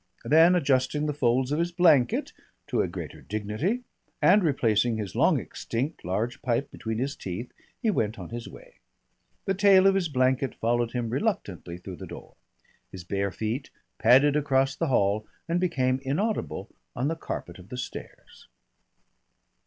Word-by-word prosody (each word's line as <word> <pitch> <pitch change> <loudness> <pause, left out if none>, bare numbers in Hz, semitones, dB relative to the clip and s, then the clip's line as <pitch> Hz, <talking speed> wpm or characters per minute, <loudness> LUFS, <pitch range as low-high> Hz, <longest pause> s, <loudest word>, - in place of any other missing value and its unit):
Then 160 +7 +6
adjusting 140 -2 +1
the 150 - -1
folds 130 -1 +1
of 150 - 0
his 170 +1 0
blanket 160 -8 +3 0.4
to - - +2
a - - 0
greater - - -7
dignity, 110 - -2 0.4
and 200 +2 +5
replacing 120 -6 +2
his 105 -4 -4
long - - +4
extinct 135 +8 -4
large 105 +7 -2
pipe 130 +1 -1
between 110 -1 -4
his 135 +4 -2
teeth, 95 +6 -6 0.3
he 220 - +3
went 110 - -1
on - - -8
his 120 +1 -6
way. - - -14 0.7
The 195 - +1
tail 195 -1 +5
of 195 - +6
his 190 -4 0
blanket 130 -1 +1
followed 120 0 0
him 120 -2 -2
reluctantly 110 - -2
through 90 0 -9
the - - -8
door. - - -10 0.6
His 95 -2 -8
bare 100 +2 -1
feet 110 +7 -3 0.3
padded 135 +5 +5
across 135 -2 +2
the 165 - -1
hall 105 -4 +1 0.2
and 170 +1 +1
became 130 -8 +1
inaudible 145 - -2 0.2
on 130 +2 0
the 165 - -1
carpet 90 - -6
of 90 +2 -14
the 125 - -6
stairs. 125 - -9
130 Hz, 160 wpm, -27 LUFS, 110-160 Hz, 0.7 s, Then